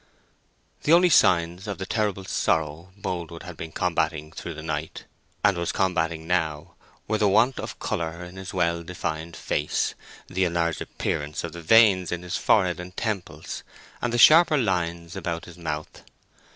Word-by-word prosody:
The 155 - +3
only 175 +1 +6
signs 90 - +3
of 100 - -3
the 95 - -4
terrible 100 -3 -1
sorrow 80 0 0
Boldwood 85 -3 -5
had 90 - -8
been 80 0 -7
combating 80 -3 -1
through 85 0 -7
the 80 - -8
night, 80 0 -4 0.4
and 100 -2 +4
was 85 - -1
combating 85 -4 0
now, 80 -4 -1 0.3
were 110 - 0
the 105 - +4
want 115 +6 +3
of - - -6
colour 85 +1 -3
in 90 +1 -11
his 95 0 -7
well 85 -2 0
defined 85 -1 -5
face, - - -1 0.3
the 95 +1 -1
enlarged 85 -1 0
appearance 75 +2 -3
of 85 - -4
the 85 - -8
veins 95 -1 +5
in 90 0 -3
his 90 - -4
forehead 90 -5 +2
and 90 +1 -9
temples, 105 -5 -4 0.4
and 120 - 0
the 120 - 0
sharper 155 +4 +7
lines 85 -7 -1
about 85 -1 -4
his 85 0 -13
mouth. 75 -2 -5
85 Hz, 165 wpm, -25 LUFS, 80-95 Hz, 0.4 s, sharper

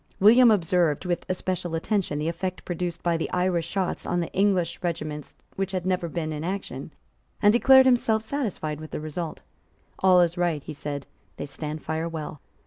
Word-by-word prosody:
William 235 +5 +7
observed 175 -6 +2
with 175 -1 -2
especial 180 -2 -2
attention 175 -2 -1
the 150 +2 -2
effect 185 +2 -3
produced 175 -1 -3
by 170 -1 +2
the 165 - -3
Irish 180 -2 0
shots 185 0 -2
on 175 - -1
the 170 - -3
English 185 -4 +1
regiments 155 -4 -4 0.2
which 195 0 -2
had 180 -1 -2
never 180 -2 0
been 160 -1 -3
in 150 0 -4
action, 190 +3 -4 0.5
and 205 0 +5
declared 265 +2 +7
himself 235 -4 +3
satisfied 200 - -3
with 155 - -8
the - - -4
result. 155 +2 -5 0.6
"All 185 -1 +6
is 175 0 +1
right," 165 -5 0
he 155 - -7
said; 145 -1 -5 0.3
"they - - -4
stand 150 +2 -6
fire 160 +1 -2
well." 155 -3 -6
175 Hz, 180 wpm, -26 LUFS, 160-190 Hz, 0.6 s, William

